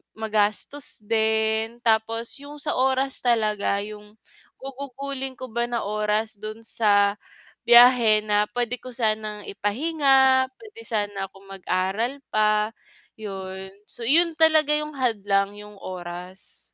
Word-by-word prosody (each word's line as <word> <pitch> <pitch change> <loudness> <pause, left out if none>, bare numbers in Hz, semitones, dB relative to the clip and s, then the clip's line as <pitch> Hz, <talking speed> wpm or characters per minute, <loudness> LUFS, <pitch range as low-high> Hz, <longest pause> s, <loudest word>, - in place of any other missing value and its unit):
magastos 220 +4 -1
din 220 +1 0
tapos 225 +3 0
yung 290 +1 -10
sa 295 +1 -3
oras 265 +1 +1
talaga 215 -4 +1
yung 210 0 -11 0.4
gugugulin 270 0 -6
ko 255 -1 -9
ba 235 +1 -1
na 235 -2 -2
oras 210 +1 -1
dun 215 +2 -7
sa 205 -2 +2 0.4
biyahe 240 -2 +7
na 210 0 +3
puwede 245 +1 -1
ko 255 +1 -11
sanang 215 -3 -2
ipahinga 265 +4 +2
puwede 440 +10 -14
sana 205 - -3
akong 195 0 -18
mag-aral 195 +7 -2
pa 215 0 +1 0.4
yun, 190 -2 -7 0.2
so 240 - -8
yun 325 +6 +5
talaga 310 -2 +4
yung 300 0 -2
hadlang 205 -7 0
yung 210 0 -12
oras. 180 0 -7
220 Hz, 120 wpm, -24 LUFS, 205-260 Hz, 0.4 s, biyahe